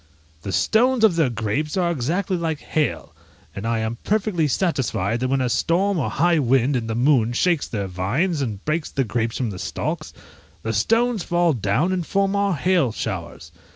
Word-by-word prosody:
The 100 - -5
stones 240 - +2
of 210 -6 +5
their 160 -6 +2
grapes 120 - -2
are 175 -2 +2
exactly 170 +7 -1
like 165 -3 -2
hail; 150 +1 -2 0.4
and 100 +3 -4
I 115 0 +1
am 110 +2 -3
perfectly 195 -6 +1
satisfied 130 - 0
that 130 - 0
when 135 +1 +1
a 130 - +1
storm 175 +9 +1
or 140 - -1
high 170 +2 +2
wind 135 +1 +2
in 115 -3 -1
the 110 - -2
moon 120 -2 +3
shakes 170 +4 +1
their 100 -3 -3
vines, 120 - -1
and 105 -6 -4
breaks 155 +1 -1
the 135 - 0
grapes 115 0 -2
from 120 -5 -2
the 90 - -7
stalks, - - -4 0.5
the 110 - -2
stones 225 - +2
fall 175 -1 +2
down 120 - 0
and 180 -2 -1
form 195 +3 0
our 200 -2 +1
hail 170 -5 +2
showers. 95 -6 -5
145 Hz, 190 wpm, -22 LUFS, 115-175 Hz, 0.5 s, of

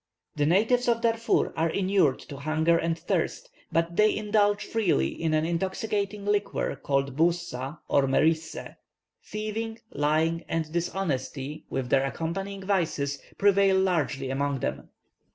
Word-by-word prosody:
The 145 -1 +1
natives 225 +8 +3
of 230 -1 +2
Darfur 230 0 +1
are 165 +1 +1
inured 185 -6 +2
to 140 - -9
hunger 155 +4 +2
and 165 0 0
thirst, - - -2 0.2
but 170 +1 0
they 215 0 +4
indulge 205 -1 +2
freely 185 - +1
in 160 - -1
an 155 0 +2
intoxicating 200 +4 -2
liquor 205 0 0
called 140 -1 -1
Bouzza 165 -4 0
or 140 -1 +3
Merissé. 160 +4 0 0.5
Thieving, 220 +1 -4
lying, 160 +3 +1
and 160 -2 -2
dishonesty, 150 -5 -3
with 130 -2 -3
their 135 -1 +4
accompanying 190 +8 -3
vices, 155 -8 0 0.2
prevail 195 -1 +4
largely 150 -8 0
among 140 -1 -1
them. - - -3
165 Hz, 135 wpm, -27 LUFS, 145-200 Hz, 0.5 s, they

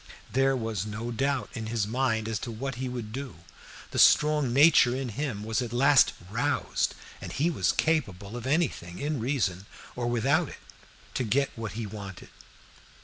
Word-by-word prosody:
There 135 +1 +3
was 110 -4 -3
no 110 +3 -4
doubt 135 +2 -1
in 115 -4 -5
his 110 -2 0
mind 110 -1 0
as 110 -1 -2
to 120 - -5
what 135 +5 -4
he 130 - -2
would 120 -4 -5
do; 135 -5 -5 0.6
the - - -1
strong 150 -4 +5
nature 135 -2 +6
in 130 -1 -3
him 120 -4 -3
was 110 +3 -1
at 120 -2 -4
last 135 +2 +5 0.2
roused, 115 - 0 0.3
and - - -6
he 165 +5 +1
was - - +1
capable 110 - -1
of 120 +1 -5
anything 135 - 0
in 145 -1 -2
reason 105 -7 -1 0.3
or 120 -1 -2
without 135 +7 +2
it - - -10 0.6
to - - -1
get 135 +5 +1
what 115 -4 -5
he 115 +1 -4
wanted. 100 -2 -8
120 Hz, 175 wpm, -28 LUFS, 110-135 Hz, 0.6 s, nature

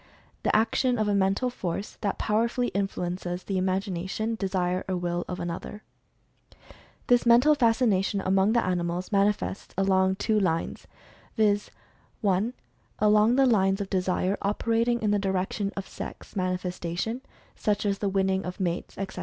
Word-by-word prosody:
e., - - -29
"The - - +1
action 235 +3 +2
of 215 -1 0
a 205 - +2
Mental 200 +6 +1
Force 195 -3 -4
that 200 -2 -1
powerfully 235 +3 0
influences 180 -2 -3
the 195 - -2
imag 190 +1 +1
ination, 195 +5 -2
desire, 185 -3 -1
or 185 - 0
will 175 0 -2
of 180 - -5
another." 175 +5 -5 1.2
This 245 -1 +4
Mental 245 +6 +6
Fas 230 -6 +3
cination, 200 -4 +2
among 190 +3 +3
the 235 - +2
animals, 180 0 -2
manifests 200 -1 0
along 190 -1 +3
two 215 +2 +1
lines, 165 -4 -1 0.5
viz., 205 -1 +2 0.5
(1) 205 +4 +1 0.4
along 210 +2 +4
the 270 0 +5
lines 195 -5 +3
of 200 -1 -4
Desire 185 +1 0
operating 230 +3 +1
in 210 - +2
the 205 - +2
direction 195 +1 -1
of 195 - -4
Sex - - -9
manifestation, 185 +4 -2 0.3
such 210 0 0
as 200 -1 0
the 200 - 0
winning 190 0 +1
of 180 +3 -6
mates, 175 -2 -3
etc. 195 -1 -5
195 Hz, 155 wpm, -27 LUFS, 185-220 Hz, 1.2 s, Mental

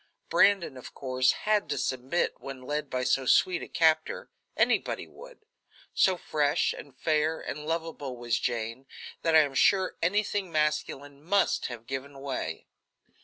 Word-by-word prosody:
Brandon, 195 -9 +3
of 125 - -11
course, 130 -1 +2
had 210 -1 +2
to - - -1
submit 130 +6 -1
when 135 -2 -8
led 145 +2 -3
by 130 0 -1
so 130 +1 +1
sweet 180 +6 +4
a - - -6
captor 160 -1 +1 0.3
anybody - - +1
would. - - -15 0.5
So 185 -1 +3
fresh, 150 -3 +1
and 135 -3 -11
fair, 155 +2 +1
and 150 +1 -6
lovable 160 -5 -3
was 120 -1 -1
Jane, 120 +2 -3 0.3
that 165 -1 +2
I 160 - +9
am 145 -2 -1
sure 190 +7 +3
anything 200 +1 0
masculine 150 -2 -1
must 195 +5 +1
have 120 -2 -8
given 135 +2 -6
way. 135 -1 -4
145 Hz, 150 wpm, -28 LUFS, 130-170 Hz, 0.5 s, I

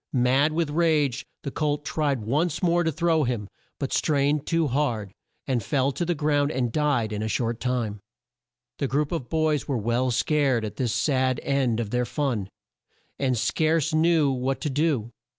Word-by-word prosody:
Mad 130 +4 +3
with 160 -2 0
rage 150 -5 +1 0.2
the 140 - -4
colt 150 -1 -1
tried 140 -7 -1
once 150 - 0
more 175 0 +3
to 160 - +1
throw 165 0 +2
him, 120 -5 -2 0.3
but 135 - -3
strained 145 0 +1
too 165 -1 +2
hard, 120 -8 -1 0.3
and 130 -4 0
fell 135 +4 +1
to 175 - -3
the 175 0 0
ground 145 -1 +1
and 125 -4 -1
died 140 -8 +1
in 105 - -3
a 110 - -1
short 115 +1 -1
time. 120 -5 -2 0.8
The 140 - 0
group 145 +3 0
of 150 -8 -3
boys 155 -3 +1
were 135 - 0
well 120 +4 0
scared 130 -2 +1
at 105 - -7
this 125 -4 0
sad 130 -1 +1
end 130 -5 +1
of 110 -3 -3
their 125 0 +1
fun, 120 -9 -2 0.7
and 130 -3 +1
scarce 155 +5 +1
knew 160 -2 +3
what 130 +1 -1
to 150 - -2
do. 135 -6 0
140 Hz, 180 wpm, -25 LUFS, 125-155 Hz, 0.8 s, Mad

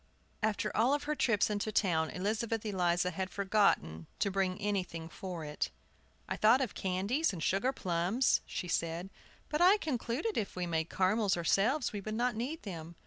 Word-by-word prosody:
After 215 -1 0
all 250 +6 +4
her 295 +1 -3
trips 225 -8 +2
into 210 +1 -1
town 165 -6 +2
Elizabeth 220 +3 -2
Eliza 180 -3 +1
had 185 +2 -3
forgotten 190 - +1
to 200 - 0
bring 190 0 0
anything 185 -5 -2
for 175 -1 -6
it. 150 0 -2 0.6
"I - - -2
thought 225 +4 +5
of 255 -6 -1
candies 200 - 0
and 170 -5 -5
sugar 200 +8 +2
plums," 185 +3 +1
she 180 - -4
said; 170 +2 -2 0.4
"but 300 +2 -1
I 375 +4 +7
concluded 295 - -2
if 205 - -4
we 180 -1 -2
made 160 -1 -1
caramels 195 0 +2
ourselves 220 - +2
we 205 - -3
should 215 +2 -4
not 240 0 +1
need 270 +9 -4
them. 170 -4 -7
200 Hz, 170 wpm, -32 LUFS, 180-230 Hz, 0.6 s, I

